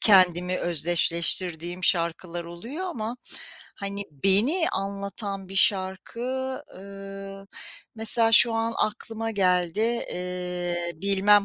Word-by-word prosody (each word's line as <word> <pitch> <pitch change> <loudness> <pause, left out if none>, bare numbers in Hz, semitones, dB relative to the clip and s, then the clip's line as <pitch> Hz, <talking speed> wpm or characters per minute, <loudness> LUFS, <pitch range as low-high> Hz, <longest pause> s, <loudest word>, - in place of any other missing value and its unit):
kendimi 180 -3 +4
özdeşleştirdiğim 175 +1 +1
şarkılar 170 0 +1
oluyor 230 - -6
ama, 235 -8 -4 0.6
hani, 200 0 -5
beni 205 - +2
anlatan 195 0 -4
bir 195 - -9
şarkı, 190 +2 +2 0.5
ııı, 195 0 -9 0.5
mesela 225 +1 +3
şu 230 +1 +8
an 225 0 0
aklıma 225 +1 -2
geldi. 180 -2 +1
Eee, 180 -5 -2
bilmem 200 +3 +3
195 Hz, 95 wpm, -26 LUFS, 175-215 Hz, 0.6 s, şu